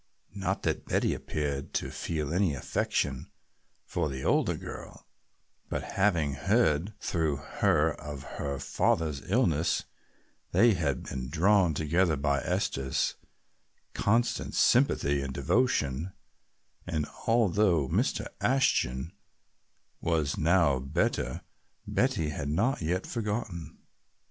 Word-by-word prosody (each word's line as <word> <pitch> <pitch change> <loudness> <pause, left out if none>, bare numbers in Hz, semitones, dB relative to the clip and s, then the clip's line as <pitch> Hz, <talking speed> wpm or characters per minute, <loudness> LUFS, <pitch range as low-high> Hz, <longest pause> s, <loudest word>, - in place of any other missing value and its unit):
Not 100 -2 -2
that - - -1
Betty - - +1
appeared 70 -2 -3
to - - -1
feel 75 -2 -3
any 90 -5 +2
affection 65 - -1 0.6
for 75 - -1
the 65 -1 -5
older - - +2
girl, - - -9 0.6
but - - -2
having 85 -8 +2
heard 90 - +1
through 80 -4 0
her 70 -1 +1
of 75 -2 -8 0.2
her 70 -1 -2
father's 70 +1 0
illness 85 - +2 0.7
they 115 -1 +6
had 75 -8 -1
been 65 -1 -5
drawn 90 +1 +3
together 80 +3 +2
by 70 0 +1
Esther's 65 0 -1 0.8
constant 115 +4 +1
sympathy 70 0 +3
and 70 -1 -5
devotion, 75 - +1 0.7
and 80 -4 -1 0.2
although 100 - +3
Mr. - - 0 0.2
Ashton 85 - +1 0.9
was 80 -4 0
now 80 -5 +3
better 65 +1 -1 0.4
Betty 80 -2 +1
had 75 -1 -4
not 110 - +1
yet 90 +4 -1
forgotten. 105 -8 -4
80 Hz, 110 wpm, -29 LUFS, 70-95 Hz, 0.9 s, they